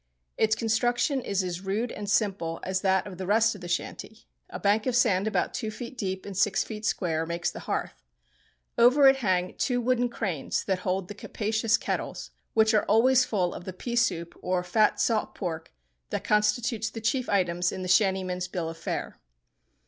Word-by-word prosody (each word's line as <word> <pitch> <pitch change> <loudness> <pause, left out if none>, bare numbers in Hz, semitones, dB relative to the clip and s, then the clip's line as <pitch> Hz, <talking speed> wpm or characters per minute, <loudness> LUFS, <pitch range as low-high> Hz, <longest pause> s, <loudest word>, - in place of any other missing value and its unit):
Its 220 0 +2
construction 240 +4 +1
is 200 -4 -1
as 180 -1 -4
rude 205 +5 -2
and 205 -1 -6
simple 195 -6 0
as 185 0 -1
that 190 -1 +2
of 190 -3 -9
the 185 - -4
rest 225 +3 +4
of 200 - -11
the 175 - -7
shanty. 175 0 -4 0.2
A - - -6
bank 210 +3 +2
of 250 - +1
sand 210 -5 +3
about 220 - 0
two 220 -4 -3
feet 235 +3 -8
deep 190 -5 -4
and 200 - -7
six 200 +2 +2
feet 215 0 -5
square 165 -6 0
makes 170 +1 -2
the - - -8
hearth. - - -3 0.8
Over 255 +4 +7
it 270 0 +6
hang 185 -7 0
two 250 -2 +1
wooden 245 0 +1
cranes 190 - -2
that 190 -2 -1
hold 185 0 -2
the 205 - -7
capacious 220 +2 0
kettles, - - -4 0.2
which 220 0 +4
are 215 - +3
always 255 +4 +4
full 185 -7 0
of 175 - -9
the 185 - -5
pea 235 +6 -5
soup 170 -9 0
or 180 0 0
fat 210 +4 +2
salt 225 -2 0
pork 165 -4 -5 0.4
that - - -3
constitute 215 +2 +1
the - - -3
chief 240 +3 -1
items 180 -3 +1
in 185 - -5
the - - -4
shantymen's 185 -1 +2
bill 170 -3 -3
of 165 0 -9
fare. - - -4
205 Hz, 195 wpm, -27 LUFS, 185-230 Hz, 0.8 s, Over